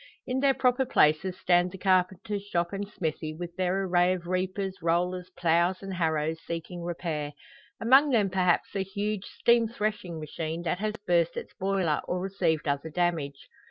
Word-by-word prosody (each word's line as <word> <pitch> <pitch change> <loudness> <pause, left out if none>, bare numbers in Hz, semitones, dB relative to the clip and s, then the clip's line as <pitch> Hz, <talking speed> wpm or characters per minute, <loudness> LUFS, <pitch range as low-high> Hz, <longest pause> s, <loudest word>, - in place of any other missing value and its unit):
In 255 +1 -1
their 275 0 +3
proper 250 0 +2
places 185 -5 +2
stand 175 0 +3
the 190 - -8
carpenters 190 +2 +1
shop 175 -3 -1
and 200 0 -3
smithy, 155 -4 -3
with 175 +1 -7
their 185 +1 0
array 180 -1 +3
of 175 -2 -5
reapers, 185 +1 -2
rollers, 180 +2 0
ploughs, 175 +3 +2
and 195 -1 -5
harrows 160 -2 0
seeking 170 +1 -5
repair; 160 -4 -3 0.5
among 265 +6 +6
them 210 -7 +2
perhaps 180 0 +1
a 195 - +1
huge 200 +1 -3
steam 235 -1 +3
threshing 210 -6 -3
machine, 160 +2 -4
that 175 +2 -1
has 215 +1 -2
burst 170 -1 +2
its - - -6
boiler, 190 -5 0
or 180 - -1
received 180 -5 0
other 140 +2 -1
damage. 160 -4 -1
180 Hz, 165 wpm, -28 LUFS, 170-195 Hz, 0.5 s, among